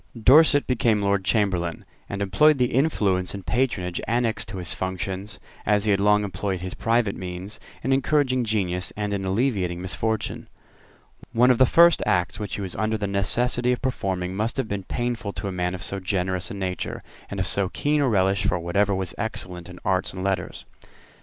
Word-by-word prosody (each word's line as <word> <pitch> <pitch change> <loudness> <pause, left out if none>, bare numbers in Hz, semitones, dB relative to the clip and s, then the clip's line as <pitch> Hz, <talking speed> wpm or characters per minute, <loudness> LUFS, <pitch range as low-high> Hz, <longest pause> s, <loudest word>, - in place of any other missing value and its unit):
Dorset 145 +5 +6
became 115 -4 +1
Lord 100 -1 +1
Chamberlain, 95 -5 0 0.2
and 100 0 -2
employed 145 +11 +4
the 125 -1 +1
influence 100 - +1
and 100 -2 -8
patronage 95 -9 -1
annexed 115 -2 0
to 95 0 -6
his 90 -2 -3
functions, 95 +1 -4 0.2
as 105 0 +2
he 105 - +3
had 100 - +2
long 105 +1 +4
employed 95 -1 -3
his 90 0 -5
private 115 -3 +1
means, 95 +3 -6 0.2
in 135 - +2
encouraging 135 -2 +2
genius 95 -5 -1
and 105 -1 -2
in 100 -1 -2
alleviating 95 -4 0
misfortune. 110 +4 -2 0.9
One 125 +2 +5
of 125 - +2
the 130 - +6
first 170 +3 +6
acts 90 -1 +1
which 105 -2 -4
he - - -5
was 95 -3 -4
under 110 +1 0
the 105 - -2
necessity 120 +5 +1
of 125 - -4
performing 95 -8 -2
must 110 +3 -1
have 130 -4 -1
been 100 -2 -4
painful 120 -3 -3
to - - -5
a - - -2
man 90 0 -2
of 90 - -7
so 100 - -3
generous 90 -1 -1
a - - -6
nature, 95 -2 -4 0.3
and - - -5
of - - +1
so 100 -2 0
keen 150 +7 0
a 135 - +2
relish 95 -2 +2
for 95 -3 +1
whatever 100 +4 +1
was 95 -2 -2
excellent 90 -6 -3
in 90 - -10
arts 95 0 +1
and 95 0 -5
letters. 95 -3 -2
100 Hz, 190 wpm, -24 LUFS, 95-115 Hz, 0.9 s, Dorset